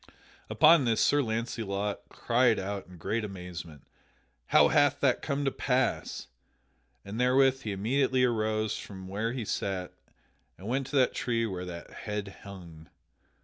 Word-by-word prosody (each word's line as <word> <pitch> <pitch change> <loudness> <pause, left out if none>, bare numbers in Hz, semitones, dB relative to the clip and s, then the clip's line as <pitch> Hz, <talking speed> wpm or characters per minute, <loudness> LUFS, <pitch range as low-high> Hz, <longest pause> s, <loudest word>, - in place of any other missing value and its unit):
Upon 155 -1 +6
this 115 -2 +1
Sir 145 +5 +4
Launcelot 110 -4 -2
cried 120 -1 +2
out 100 0 -4
in 90 -1 -13
great 110 +7 -2
amazement, 90 -7 -8 0.6
"How - - +5
hath - - +3
that - - +2
come 140 +1 -2
to 135 - +1
pass?" 130 -2 -1 0.8
and 110 +5 -4
therewith 130 +1 +4
he 110 - -4
immediately 130 +6 +1
arose 110 -3 0
from 95 -2 -8
where 105 +4 -2
he 120 -3 -4
sat 95 -3 -3 0.6
and 95 - -10
went 130 +2 -1
to 140 - -6
that 130 -2 +4
tree 115 -2 -1
where 90 -4 -4
the 85 -1 -6
head 105 -2 -5
hung. 85 -5 -11
110 Hz, 145 wpm, -29 LUFS, 95-125 Hz, 0.8 s, Upon